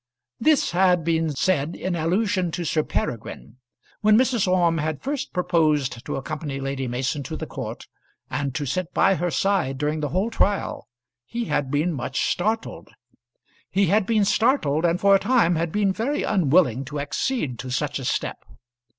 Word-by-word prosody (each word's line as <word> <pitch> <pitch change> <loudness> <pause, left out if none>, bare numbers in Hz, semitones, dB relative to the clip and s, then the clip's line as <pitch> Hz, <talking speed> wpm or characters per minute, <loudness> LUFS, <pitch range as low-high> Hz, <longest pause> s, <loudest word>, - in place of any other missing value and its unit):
This 305 +3 +3
had 180 -1 +3
been 165 0 +1
said 150 +1 0
in 185 -1 -3
allusion 185 +3 0
to 175 -1 -3
Sir 155 0 +1
Peregrine. 115 -3 -4 0.4
When 215 0 +5
Mrs. 245 -5 +2
Orme 175 -3 +2
had 155 -1 -3
first 280 0 -3
proposed 155 -9 +1
to - - -2
accompany 145 0 -4
Lady 135 -1 -3
Mason 130 +4 -2
to 135 - -6
the - - -5
court - - -7 0.4
and 140 -3 -3
to 145 - -2
sit 180 +6 -3
by 195 - +4
her 175 -1 -1
side 180 -8 0
during 150 +2 -1
the 150 -1 -2
whole 190 +8 -1
trial, 205 -2 0 0.4
he 235 0 -3
had 145 -6 -1
been 150 +5 0
much 135 0 -3
startled. 220 +5 -2 0.8
He 195 +1 +2
had 210 -2 +2
been 215 -3 +3
startled, 195 - +2
and 170 +1 +2
for 200 0 +5
a 195 - +6
time 230 -7 +3
had 165 0 -1
been 200 0 +1
very 245 +9 -1
unwilling 150 - +2
to 145 +2 -5
accede 145 - -2
to 130 - -6
such 140 +3 -1
a - - -6
step. 120 - -2
170 Hz, 175 wpm, -24 LUFS, 145-200 Hz, 0.8 s, a